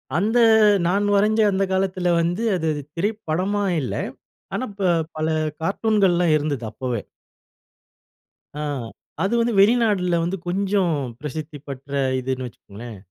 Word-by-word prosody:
அந்த 215 +8 +2 0.5
நான் 200 +3 +1
வரைஞ்ச 215 +2 +3
அந்த 195 0 +1
காலத்தில 185 -2 +1
வந்து, 175 +6 0
அது 160 -1 -1 0.3
திரைப்படமா 200 +1 -1 0.2
இல்ல. 130 - -3 0.6
ஆனா 225 - -1
இப்போ 195 -2 0 0.3
பல 155 - -1 0.4
கார்ட்டூன்கள்லாம் 185 -3 +2
இருந்தது 145 -4 -2
அப்பவே. 120 -1 -3 1.5
ஆ. 150 - -4 0.6
அது 195 - 0
வந்து 235 0 +1
வெளிநாட்டில 205 -5 +3
வந்து 180 +3 -2
கொஞ்சம் 190 0 +1 0.3
பிரசித்தி 150 +1 -6
பெற்ற 140 0 -8 0.3
இதுன்னு 130 0 -3
வச்சுக்கோங்களேன். 115 0 -11
180 Hz, 115 wpm, -22 LUFS, 150-200 Hz, 1.5 s, வரைஞ்ச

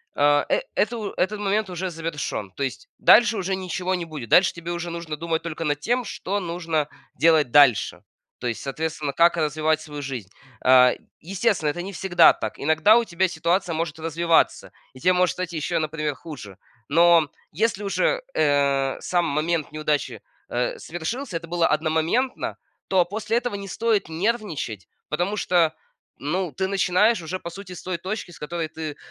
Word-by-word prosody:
а, 145 0 +3
э, - - +1
это 240 - +1
у 215 -2 -4
этот 205 +3 -1
момент 205 0 0
уже 185 +1 -3
завершён. 160 - -4
То 140 - -3
есть 140 - -4
дальше 230 -2 +6
уже 190 0 -1
ничего 185 0 -3
не 175 -2 -4
будет. 150 -8 -8
Дальше 180 0 +5
тебе 170 0 -6
уже 175 0 -4
нужно 165 -2 -5
думать 165 0 -2
только 165 -1 -4
над 145 -1 -1
тем, 245 +6 0
что 200 +1 -3
нужно 165 -4 -2 0.3
делать 155 -5 +4
дальше. 135 -7 +4 0.4
То 125 - -3
есть, 115 - -3
соответственно, 150 0 -3
как 170 +2 +4
развивать 155 0 +1
свою 150 -2 -7
жизнь. 130 -8 -6 0.4
А, 125 -1 +7 0.3
естественно, 185 -3 0
это 175 +4 -3
не 195 +2 -7
всегда 180 0 +5
так. - - -6
Иногда 160 +9 +5
у 235 - +1
тебя 185 -1 +1
ситуация 170 +2 0
может 160 -1 -3
развиваться, 165 +1 +1 0.2
и 130 - -13
те 180 +6 +3
может 180 0 +2
стать 180 -1 -5
ещё, 155 -1 -1
например, 155 -1 -2
хуже. 130 - -10 0.3
Но 170 -2 +5 0.2
если 210 +3 0
уже, - - +1
э, 140 -2 +2
сам 175 -1 0
момент 155 +1 -1
неудачи, 150 -7 -2 0.3
э, 120 0 -1
совершился, 175 - -4
это 170 0 -9
было 170 0 +2
одномоментно, 160 - 0 0.3
то 185 -2 +4
после 215 +5 -1
этого 245 -3 -2
не 200 -1 -6
стоит 220 -3 0
нервничать, 165 - -2 0.2
потому 180 +7 -1
что, 175 -4 +2 0.4
ну, 175 +4 -2
ты 190 +8 -2
начинаешь 195 +2 +2
уже, 180 +3 -4
по 170 - -7
сути, 190 +2 -10
с 175 - -9
той 185 -2 -3
точки, 190 0 -5
с - - -14
которой 165 +2 -3
ты, 155 -1 -6
170 Hz, 175 wpm, -24 LUFS, 150-190 Hz, 0.4 s, А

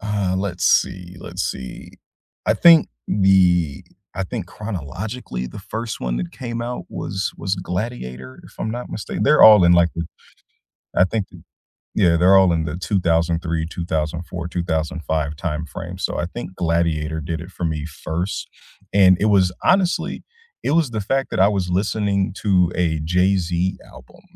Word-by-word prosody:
Uh, 100 -3 -1
let's 95 -2 -2
see, 90 -2 +1
let's - - -5
see. 65 -1 -6 0.5
I - - +3
think 165 -2 +7 0.2
the 90 -7 +3 0.3
I 95 0 -2
think 105 -3 -5
chronologically, 95 - -5
the - - -9
1st 115 +3 -5
one - - -2
that 85 +7 -3
came 115 -2 -5
out 125 +1 -4
was 95 0 -3
was 95 0 -2
Gladiator, 90 - -5
if - - -15
I'm 110 - -2
not 120 +2 -5
mistaken 105 - -4
they're 150 +2 +5
all 105 -4 +9
in 85 - +6
like 85 -1 +5
the 85 - -3 0.9
I 90 - +5
think 105 0 -2
th - - -14 0.6
yeah, 85 -2 +4
they're 90 +3 +6
all 95 -2 +5
in 80 -1 0
the 80 0 -4
2003, 85 -3 0
2004, 85 0 -3
2005 80 -3 -2
timeframe, 85 +3 -5
so - - -2
I - - -1
think 95 0 -7
Gladiator 80 -2 0
did 80 +1 -4
it 90 +2 -9
for 90 - -6
me 80 -2 -2
1st 85 +4 -4 0.4
and 95 -2 +6
it 105 - +3
was 95 -4 +4
honestly, 185 -2 +1 0.4
it - - -1
was 160 -5 +2
the 110 -2 -3
fact 135 +6 -1
that - - -1
I 95 - +6
was 95 -3 -1
listening 100 +1 0
to 90 -4 +3
a 80 -3 0
Jay-Z 90 +1 +1 0.2
album, - - -16
90 Hz, 165 wpm, -21 LUFS, 85-100 Hz, 0.9 s, all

